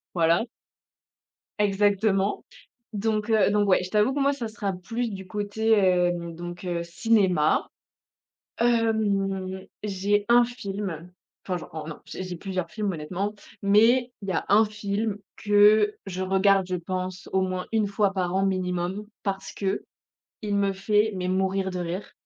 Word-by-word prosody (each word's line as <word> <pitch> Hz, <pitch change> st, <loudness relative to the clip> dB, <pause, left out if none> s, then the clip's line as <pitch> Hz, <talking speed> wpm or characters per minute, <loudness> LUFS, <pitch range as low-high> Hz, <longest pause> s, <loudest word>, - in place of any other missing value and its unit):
voilà. 170 Hz, +6 st, +3 dB, 1.1 s
Exactement 200 Hz, 0 st, +2 dB, 0.5 s
donc 215 Hz, +1 st, -1 dB
heu, 215 Hz, -3 st, +4 dB
donc 205 Hz, -1 st, +2 dB
ouais, 185 Hz, -1 st, +4 dB
je 180 Hz, -, -6 dB
t'avoue 215 Hz, +5 st, +2 dB
que 285 Hz, -, -2 dB
moi, 280 Hz, +1 st, +3 dB
ça 240 Hz, -5 st, -4 dB
sera 210 Hz, -3 st, -3 dB
plus 225 Hz, +7 st, -3 dB
du 190 Hz, -1 st, -8 dB
côté, 210 Hz, +3 st, -1 dB
hem, 175 Hz, -4 st, +2 dB
donc 175 Hz, +1 st, -7 dB
heu, 170 Hz, -1 st, -2 dB
cinéma. 180 Hz, -3 st, +2 dB, 0.9 s
Hem, 200 Hz, -5 st, +1 dB, 0.2 s
j'ai 205 Hz, +1 st, 0 dB
1 240 Hz, +1 st, +7 dB
film 200 Hz, -8 st, -5 dB, 0.4 s
enfin, 180 Hz, -, 0 dB
j'en 155 Hz, -2 st, -8 dB
non, 160 Hz, -, -7 dB
j'ai -, -, -6 dB
j'ai 180 Hz, -1 st, -5 dB
plusieurs 185 Hz, -1 st, -4 dB
films, 210 Hz, -2 st, -2 dB
honnêtement 185 Hz, +6 st, -3 dB, 0.3 s
mais 225 Hz, +5 st, +4 dB
il 195 Hz, -, -5 dB
y -, -, +1 dB
a -, -, -1 dB
1 215 Hz, +2 st, +6 dB
film 205 Hz, 0 st, -2 dB, 0.2 s
que 210 Hz, 0 st, +5 dB
je 185 Hz, -1 st, -5 dB
regarde, 190 Hz, 0 st, +3 dB
je 185 Hz, -, -1 dB
pense, 185 Hz, +1 st, -4 dB
au 190 Hz, -, +3 dB
moins 185 Hz, -1 st, -2 dB
1 220 Hz, -2 st, +2 dB
fois 200 Hz, 0 st, +1 dB
par 185 Hz, -1 st, -1 dB
an 195 Hz, +1 st, +2 dB
minimum 185 Hz, +1 st, -1 dB, 0.2 s
parce 195 Hz, -1 st, -3 dB
qu'il 195 Hz, 0 st, -2 dB, 0.7 s
me 200 Hz, -1 st, +2 dB
fait 210 Hz, +3 st, +1 dB
mais 180 Hz, 0 st, -2 dB
mourir 190 Hz, +1 st, 0 dB
de 185 Hz, -, -4 dB
rire 175 Hz, +3 st, -5 dB
195 Hz, 155 wpm, -26 LUFS, 185-210 Hz, 1.1 s, 1